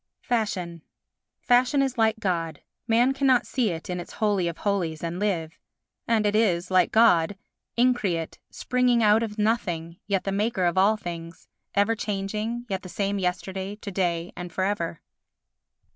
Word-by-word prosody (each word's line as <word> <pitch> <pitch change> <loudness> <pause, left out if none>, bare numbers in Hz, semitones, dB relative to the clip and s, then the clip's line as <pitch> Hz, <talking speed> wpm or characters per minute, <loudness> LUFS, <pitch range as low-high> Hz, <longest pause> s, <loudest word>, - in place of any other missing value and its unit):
Fashion 190 -8 -2 0.6
Fashion 255 +3 +3
is 265 -2 -1
like 220 -1 +2
God, 165 -6 -2 0.2
man 240 +3 +4
cannot 270 -2 +3
see 245 -5 0
it 165 -2 -5
in 180 -1 -3
its 175 - -8
holy 205 -5 +1
of 170 -1 -4
holies 175 -6 -1
and 170 +1 -3
live. 165 -6 -2 0.5
And 225 -2 +2
it 205 0 +2
is, 185 -5 +2
like 185 -1 +4
God, 205 -5 +4 0.4
increate, 220 -10 +1
springing 250 -2 +1
out 210 +1 +5
of 220 -2 -4
nothing, 175 -7 -1
yet 195 -2 0
the 195 - -2
maker 200 -1 0
of 175 - +1
all 200 +3 +4
things—ever 175 +4 -3
changing 210 +3 -3
yet 190 -3 -3
the 185 - -10
same 200 +1 -1
yesterday, 190 +2 -3
to 210 -1 -8
day 175 -2 -1
and 180 -1 -7
for 185 - -1
ever. 180 -5 -2
200 Hz, 160 wpm, -25 LUFS, 175-225 Hz, 0.6 s, out